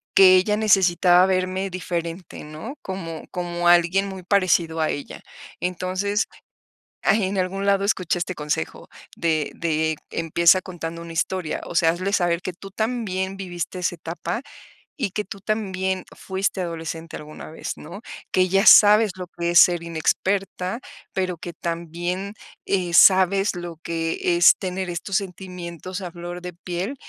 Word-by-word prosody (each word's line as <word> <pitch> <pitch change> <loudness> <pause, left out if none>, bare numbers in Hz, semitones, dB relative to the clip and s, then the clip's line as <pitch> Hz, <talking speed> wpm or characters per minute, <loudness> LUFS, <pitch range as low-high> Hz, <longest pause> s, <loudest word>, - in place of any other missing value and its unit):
que 185 -1 +8
ella 210 +3 +3
necesitaba 185 -4 +5
verme 185 +1 0
diferente, 175 -1 -5
¿no? 155 - -8
Como 165 -4 -6
como 175 -1 -2
alguien 175 +3 +4
muy 190 -2 -8
parecido 170 -4 +2
a 155 - +1
ella. 145 - -5 0.4
Entonces, 185 +3 -1 0.8
en 195 -2 +2
algún 195 +2 -2
lado 200 0 +3
escuché 185 -3 0
este 180 +1 -3
consejo 150 - -3 0.3
de 160 -3 0
de 160 -1 0 0.2
empieza 170 +3 +3
contando 170 -2 -6
una 170 0 -8
historia. 170 -1 -1
O - - -7
sea, 165 -1 +4
hazle 185 +4 -1
saber 175 -3 +1
que 185 - -4
tú 195 +3 -11
también 200 -3 -2
viviste 180 -2 -5
esa 175 0 -1
etapa 170 +8 -4 0.6
y 235 -9 -1
que 210 +1 -3
tú 200 0 -9
también 190 -3 -2
fuiste 190 0 -2
adolescente 165 -1 -5
alguna 150 0 -10
vez, 160 - -5
¿no? 170 +7 -10 0.3
Que 185 0 +3
ya 195 +3 +2
sabes 210 0 +8
lo 180 - -5
que 170 0 -3
es 175 - +7
ser 175 -2 +5
inexperta, 185 +4 -1 0.3
pero 185 -1 -1
que 170 +1 -7
también, 175 +4 -4 0.3
eh, 180 -3 -1
sabes 190 +1 +5
lo 175 -1 -6
que 165 +1 -1
es 175 - +8
tener 185 -1 -4
estos 180 +3 -2
sentimientos 180 -1 -6
a 180 -3 -6
flor 175 +1 -7
de 180 0 -7
piel 180 +8 -4
180 Hz, 150 wpm, -23 LUFS, 170-195 Hz, 0.8 s, que